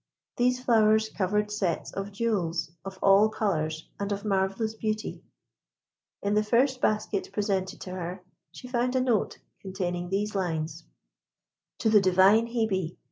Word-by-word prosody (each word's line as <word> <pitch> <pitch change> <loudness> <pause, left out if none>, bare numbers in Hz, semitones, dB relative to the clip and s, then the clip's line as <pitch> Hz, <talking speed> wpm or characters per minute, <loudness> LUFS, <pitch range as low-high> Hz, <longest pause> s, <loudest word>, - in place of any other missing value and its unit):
These 250 +1 +1
flowers 220 -2 +4
covered 210 +2 -1
sets 190 -6 -2
of 195 +1 -5
jewels 195 -7 -1
of 195 0 -8
all 200 +2 +6
colours 160 -7 -2
and 200 0 -3
of 200 +1 -3
marvellous 195 +2 0
beauty. 215 -1 -3 1.0
In 200 +1 +1
the 210 - +4
first 250 +4 +2
basket 215 -2 0
presented 195 -2 -1
to 185 - -7
her, 180 0 -5 0.3
she 250 - -10
found 250 +1 0
a - - +4
note 240 -5 0 0.2
containing 180 -2 -3
these 205 +2 -1
lines: 165 -5 -3 0.9
TO 220 - +1
THE 210 -2 +6
DIVINE 190 +4 +5
HEBE. 210 -8 -1
205 Hz, 140 wpm, -27 LUFS, 185-220 Hz, 1.0 s, all